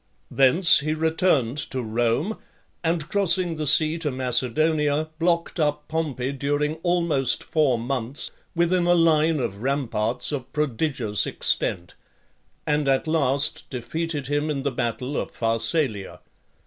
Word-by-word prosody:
XXXV. - - -12
Thence 170 +8 +6
he 155 +2 -2
returned 160 -5 +1
to 130 -2 -3
Rome, 120 - -1 0.4
and 165 -1 -1
crossing 185 -3 +1
the 155 -1 -2
sea 155 +3 +4
to 160 -2 -2
Macedonia, 145 +4 0
blocked 170 0 0
up 150 -1 -1
Pompey 145 -5 -2
during 145 +3 -1
almost 170 -6 +1
four 150 -6 +1
months, 125 +2 -2 0.2
within 175 +1 +2
a 175 - +5
line 160 -2 +3
of 110 -5 -4
ramparts 125 -2 -1
of 135 -4 -5
prodigious 135 -6 -1
extent; 85 0 -1 0.7
and 150 -1 0
at 135 +2 +2
last 145 -3 +1
defeated 145 +4 -4
him 145 +3 -1
in 140 -3 -2
the 140 - -1
battle 125 +3 -3
of - - -3
Pharsalia. 115 - -1
145 Hz, 135 wpm, -24 LUFS, 125-160 Hz, 0.7 s, Thence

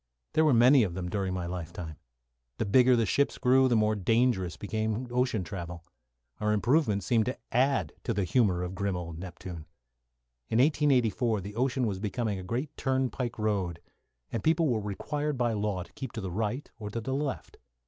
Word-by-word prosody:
There 160 - +4
were 155 - +5
many 125 +4 +7
of 90 -6 0
them 90 -1 -3
during 95 -1 -1
my 90 -1 -3
life 85 -1 -5
time. 80 -3 -7 0.6
The - - -1
bigger 125 +5 +5
the 115 -1 +2
ships 140 +8 +1
grew, 130 +1 +4
the 120 - +2
more 110 -1 +3
dangerous 110 -3 +1
became 110 +3 -2
ocean 125 -5 +1
travel. 85 -1 -7 0.5
Our 105 0 +1
improvements 110 - +2
seemed 115 -2 +2
to 130 - -2
add 135 +3 +2
to - - 0
the 100 - 0
humour 90 -2 +2
of 90 +1 -4
grim 100 -1 -1
old 85 -2 -6
Neptune. 90 -3 -8 0.8
In - - +1
1884 125 -6 +2
the 100 +3 -8
ocean 130 +1 +1
was 100 -4 -2
becoming 105 0 -2
a - - -7
great 125 +10 -3
turnpike 130 -2 -1
road, 100 -6 -1 0.5
and 115 - -3
people 160 0 +3
were 115 -3 +1
required 145 +9 -3
by 120 -2 +1
law 105 -3 -1
to - - -19
keep 130 -3 -7
to 110 - -4
the 95 -2 -4
right 110 +8 -2
or 105 -2 -5
to 115 - -3
the 130 +4 -3
left. 140 0 -3
110 Hz, 190 wpm, -29 LUFS, 95-125 Hz, 0.8 s, many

